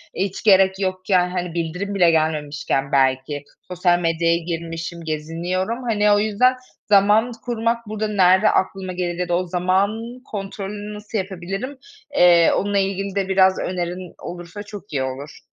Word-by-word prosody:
Hiç 190 +1 -3
gerek 190 -2 +5
yokken, 185 -1 +1
hani, 180 -2 -3
bildirim 175 +4 -3
bile 175 -3 +5
gelmemişken 150 -3 -1
belki 135 +1 +1 0.2
sosyal 180 -1 +2
medyaya 165 0 +1
girmişim, 170 0 -5
geziniyorum. 170 +9 -3
Hani, 210 -3 +2
o 205 - +5
yüzden 220 +5 +3 0.3
zaman 210 +4 +4
kurmak 230 -1 0
burada 215 0 -2
nerede 190 0 +4
aklıma 190 -1 -1
gelir 175 -1 -3
ya 180 -1 -2
da 175 - +2
o 185 - -2
zaman 200 +7 0
kontrolünü 205 0 -6
nasıl 210 +1 -6
yapabilirim, 195 +7 -4 0.4
eee, 170 -4 +6
onunla 200 +1 0
ilgili 195 0 -1
de 195 -1 0
biraz 190 0 +4
önerin 180 0 -4
olursa 175 +3 -8
çok 205 -3 -11
iyi 135 - 0
olur. 135 +3 -6
185 Hz, 145 wpm, -21 LUFS, 170-205 Hz, 0.4 s, eee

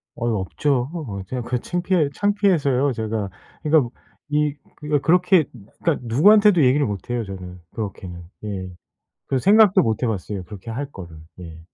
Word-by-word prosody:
아이 120 - -2
없죠. 125 +6 -1 0.4
제가 125 +3 -3
그 125 +1 -2
창피해 175 0 0
창피해서요 165 -10 +2
제가. 110 -2 -3 0.3
그러니까 150 -5 +3 0.4
이 150 0 +1 0.5
그렇게 180 0 +4 0.4
그러니까 165 -3 +3
누구한테도 185 - +5
얘기를 140 +3 +3
못 100 -2 -5
해요 120 -1 -1
저는 90 -2 -8
그렇게는. 95 -5 -6 0.2
예. 95 -3 -5 0.6
그 135 - 0
생각도 205 - +5
못 110 0 -1
해 125 - +2
봤어요. 100 -2 -3
그렇게 105 +3 -9
할 135 +5 -4
거를. 85 -4 -10 0.2
예. 80 -2 -10
125 Hz, 320 characters per minute, -22 LUFS, 100-160 Hz, 0.6 s, 누구한테도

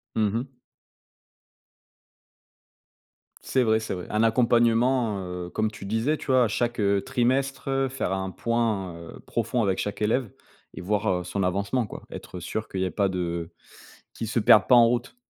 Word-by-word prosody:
Mmh 105 -2 +2
mh. 130 +2 -5 2.9
C'est 130 - +1
vrai, 110 -1 +3
c'est 110 - -4
vrai. 90 -1 -6
Un 105 +1 +1
accompagnement, 115 -1 +3 0.3
heu, - - -8
comme 110 +2 -1
tu 105 - -10
disais, 115 +9 0
tu - - -11
vois, 130 -3 +4
chaque, 120 +3 -1
heu, 100 -1 +2
trimestre, 135 +3 0
heu, 135 0 +1
faire 135 -6 -3
un 95 0 -2
point, 110 -7 -1
heu, 85 -1 -11
profond 125 - -1
avec 95 -2 0
chaque 105 +1 -4
élève 115 +2 +1 0.4
et - - -8
voir, 105 +3 -1
heu, 90 -1 0
son 100 +2 -2
avancement 100 +6 0
quoi. - - -9
Être 90 - -8
sûr 110 +5 -4
qu'il 95 - -3
y - - +1
ait 90 - -2
pas 100 +4 +1
de, 90 -1 -3
heu, 85 -1 -3 0.6
qu'il 115 - -5
se 115 - 0
perde 105 -1 +6
pas 125 - +6
en 120 -1 +8
route. 120 +1 -2
110 Hz, 180 wpm, -26 LUFS, 100-120 Hz, 2.9 s, en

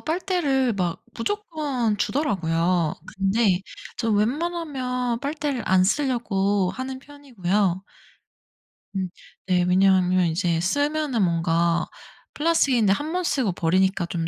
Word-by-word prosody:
빨대를 310 - 0
막 180 -4 -2
무조건 285 - -2
주더라고요. 180 - 0 0.2
근데 195 -1 +2 0.4
저 230 -2 -1
웬만하면 250 0 -1
빨대를 285 -3 -2
안 185 -1 +5
쓰려고 205 -6 +1
하는 260 +2 -5
편이고요. 210 -10 -2 1.1
음 190 -1 -2 0.4
네 180 -2 +3
왜냐하면 185 0 +3
이제 170 0 0
쓰면은 285 - 0
뭔가 170 -1 +1 0.5
플라스틱인데 275 -10 +3
1 295 +9 -3
번 365 +1 -1
쓰고 260 - 0
버리니까 185 +2 +1
좀 170 -1 -3
215 Hz, 250 characters per minute, -24 LUFS, 185-285 Hz, 1.1 s, 안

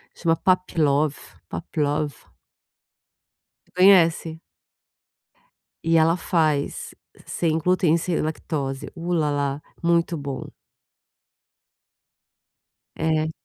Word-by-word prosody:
chama 165 -1 +1
pavlove, 155 -6 +1 0.3
pavlove. 145 - -3 1.4
Você - - -31
conhece? 170 -3 +4 1.4
E 165 0 +3
ela 165 +2 +4
faz 155 -6 -1 0.3
sem 160 -2 0
glúten 170 -1 +2
sem 170 0 -1
lactose, 145 -3 -3
u-lá-lá, 150 -5 -1 0.2
muito 170 0 +1
bom. 140 -2 -6 2.5
É. 160 0 0
160 Hz, 70 wpm, -23 LUFS, 145-170 Hz, 2.5 s, conhece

